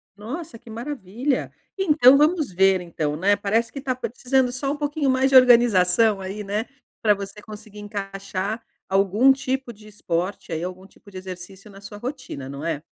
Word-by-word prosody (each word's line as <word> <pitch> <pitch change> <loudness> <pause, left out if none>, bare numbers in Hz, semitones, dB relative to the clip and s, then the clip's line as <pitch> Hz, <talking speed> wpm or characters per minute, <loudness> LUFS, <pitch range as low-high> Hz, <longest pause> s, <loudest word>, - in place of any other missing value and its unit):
Nossa, 240 +5 -7
que 235 0 -17
maravilha. 245 +1 -3 0.3
Então 295 -8 +6
vamos 305 - +2
ver, 190 0 +3
então, 155 -4 -3
né, 200 +5 +3
parece 220 +3 0
que - - -11
está 265 -2 -1
precisando 255 +1 0
só 275 +2 -2
um - - -2
pouquinho 290 -1 -1
mais 260 +1 +2
de 270 - +2
organização 225 -5 +5
aí, 195 +2 -6
né, 210 +3 -2 0.4
pra 210 -1 +5
você 200 +1 -7
conseguir 210 -1 -11
encaixar 200 +1 -5 0.3
algum 200 +7 +4
tipo 265 -1 -2
de 215 -1 -16
esporte 180 -3 -3
aí, 165 +1 -2
algum 185 +1 -7
tipo 200 - -19
de 190 - -9
exercício 185 +2 -9
na 195 0 -14
sua 205 +1 -10
rotina, 245 - -6
não 140 +3 -7
é? 155 -3 -2
210 Hz, 175 wpm, -23 LUFS, 190-255 Hz, 0.4 s, Então